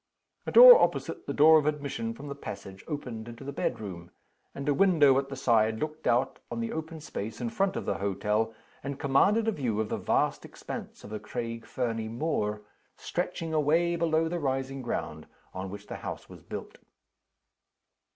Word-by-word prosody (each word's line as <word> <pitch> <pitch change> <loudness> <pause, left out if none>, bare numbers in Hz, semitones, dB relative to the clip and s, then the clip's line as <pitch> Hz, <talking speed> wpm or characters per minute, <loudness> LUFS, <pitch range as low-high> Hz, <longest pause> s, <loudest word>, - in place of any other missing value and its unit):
A - - -1
door - - +11
opposite - - -1
the - - -2
door 155 +2 +7
of 150 - -2
admission 150 +10 -2
from 145 - -9
the 140 - -4
passage 100 -8 -9
opened 125 -7 -5
into 120 +3 -9
the 140 - -5
bedroom; 95 -10 -4 0.5
and 140 +1 -5
a 145 - +4
window 150 -7 +5
at 135 0 -5
the 135 - -5
side 110 -4 +2
looked 155 +4 -4
out 125 +3 +1
on 120 - -4
the 115 - -2
open 160 0 -5
space 110 -8 -6
in 120 -2 -3
front 195 +9 0
of - - -3
the - - -2
hotel, 105 +3 0 0.3
and 140 0 -4
commanded 200 +11 +3
a - - +3
view 125 - -2
of 110 -1 -1
the - - -1
vast - - 0
expanse - - -8
of 105 - -10
the 110 - -4
Craig 115 -1 -5
Fernie 115 -3 -2
moor, 110 -5 -2 0.3
stretching 165 -1 -3
away 160 +3 +2
below 165 -1 +1
the 175 +1 -2
rising 135 -1 -2
ground 80 -10 -4 0.3
on 95 +1 -5
which 100 +1 -9
the - - -7
house - - -7
was - - -13
built. - - -8
135 Hz, 185 wpm, -28 LUFS, 110-155 Hz, 0.5 s, door